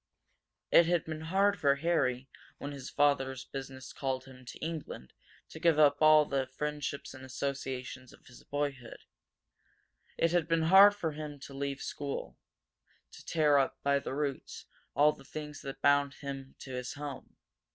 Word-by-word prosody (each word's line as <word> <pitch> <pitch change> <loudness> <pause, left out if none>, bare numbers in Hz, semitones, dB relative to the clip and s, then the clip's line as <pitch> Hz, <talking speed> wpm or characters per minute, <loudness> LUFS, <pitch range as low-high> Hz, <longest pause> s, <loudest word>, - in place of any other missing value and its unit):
It 170 - +7
had 175 -2 +1
been 155 -1 -5
hard 195 +5 +2
for 140 -1 +4
Harry, 140 -5 0 0.3
when 145 - -6
his 140 -2 -7
father's 135 -3 +1
business 135 -1 -8
called 130 -1 -3
him 130 -1 -14
to - - -9
England, 155 - -6 0.4
to - - -10
give 165 -3 +3
up 145 -1 +5
a - - +4
all 155 -1 +7
the 135 -2 -1
friendships 145 +1 -4
and 130 - -11
associations 130 -1 -5
of - - -19
his 125 - -15
boyhood. 140 -4 -4 1.2
Had 170 -1 +2
been 165 -1 +2
hard 195 +5 +8
to 150 -2 -4
leave 140 0 -3
school; 140 - -5 0.8
to - - -13
tear 150 -3 +3
up, 135 - 0
by 140 0 +3
the 135 - -5
roots, 145 -2 -4 0.3
all 150 +1 +5
the - - -14
things 150 +1 -7
that 135 0 -8
bound 140 -1 +3
him 135 -1 -7
to 135 - -8
his 125 0 -4
home. 145 -1 -8
140 Hz, 160 wpm, -31 LUFS, 135-155 Hz, 1.2 s, hard